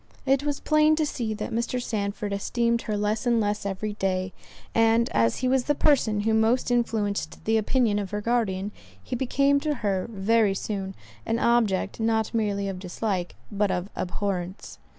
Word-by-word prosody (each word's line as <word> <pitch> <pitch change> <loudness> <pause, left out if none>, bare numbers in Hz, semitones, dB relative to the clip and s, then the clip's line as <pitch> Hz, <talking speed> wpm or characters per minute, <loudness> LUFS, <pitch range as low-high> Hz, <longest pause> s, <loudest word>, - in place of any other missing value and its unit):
It 270 0 +3
was 290 -1 -2
plain 305 0 +4
to 310 0 +1
see 230 -6 -3
that 210 +2 -5
Mr. 235 +2 -1
Sandford 205 -3 -3
esteemed 235 +3 0
her 210 -1 -2
less 210 +4 -1
and 235 -1 +3
less 205 -1 -1
every 205 +2 -3
day; 190 -2 -1 0.4
and 225 +1 +4
as 115 0 +2
he - - +3
was 260 -1 +2
the 295 - +1
person 235 -9 +2
who 220 +1 +1
most 225 +3 +2
influenced 220 -4 -1
the 220 0 +3
opinion 220 -1 +1
of 200 -2 -4
her 210 - -2
guardian, 210 -3 0 0.3
he - - -4
became 275 +3 +2
to 300 0 -1
her, 190 -2 0
very 210 0 +2
soon, 195 -1 -4 0.3
an 225 - -1
object 230 -5 +1
not 220 0 0
merely 205 -3 0
of 190 -2 -4
dislike, 185 -1 -3 0.2
but 205 0 +1
of 180 +2 -2
abhorrence. 185 0 -4
215 Hz, 175 wpm, -26 LUFS, 200-235 Hz, 0.4 s, plain